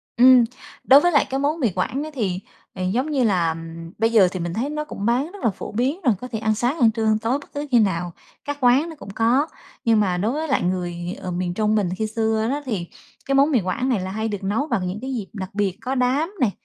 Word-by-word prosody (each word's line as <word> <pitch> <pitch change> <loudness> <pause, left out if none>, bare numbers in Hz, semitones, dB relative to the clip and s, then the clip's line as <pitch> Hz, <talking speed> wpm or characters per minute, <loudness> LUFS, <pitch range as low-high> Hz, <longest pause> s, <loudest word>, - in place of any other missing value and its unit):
Ừm, 250 0 +7 0.4
đối 270 +2 +8
với 350 - +3
lại 285 - +4
cái 270 - -1
món 295 +4 0
mì 245 -6 +2
Quảng 255 +10 -1
á 310 - -6
thì, 195 -9 -1 0.3
ờ, 185 - -5
giống 245 +11 0
như 270 -4 +2
là 175 -7 +2 0.4
bây 225 +1 +2
giờ 210 -5 +6
thì 185 - -4
mình 170 0 -3
thấy 240 +9 -2
nó 300 0 -3
cũng 205 -9 -6
bán 250 +8 +1
rất 405 0 -11
là - - +4
phổ 195 - -7
biến 260 - -1
rồi, 240 - +5
có 250 - -5
thể 225 -3 -4
ăn 220 0 +1
sáng, 245 +8 -1
ăn 230 -4 +5
trưa, 220 0 -2
ăn 215 0 +3
tối, 235 +5 0
bất - - -16
cứ 290 +1 -4
khi 240 - +6
nào, 175 -4 0 0.3
các 290 0 -3
quán 260 +6 +4
nó 325 - -8
cũng 270 - -11
có. 230 +8 +2 0.4
Nhưng 225 -2 +4
mà 185 -4 +1
đối 210 +6 0
với 310 +4 -2
lại 275 - +1
người, 175 0 -2
ờ, 185 - -4
miền 175 0 -2
Trung 215 +2 +1
mình 200 -4 +1
khi 220 - -1
xưa 220 0 0
đó 285 +3 -1
thì 200 -9 -3 0.4
cái 275 - 0
món 280 +3 +4
mì 255 - +4
Quảng 195 +8 -1
này 240 -6 +1
là 185 0 -4
hay 220 +2 -2
được 205 -2 -4
nấu 215 +10 0
bằng 185 -11 -1
những 185 +4 -4
cái 265 +1 -4
dịp 210 -5 -4
đặc 190 -3 -5
biệt, 200 -2 -1
có 255 +3 -2
đám 270 +8 +1
này 235 -5 +3
225 Hz, 275 wpm, -22 LUFS, 195-270 Hz, 0.4 s, đối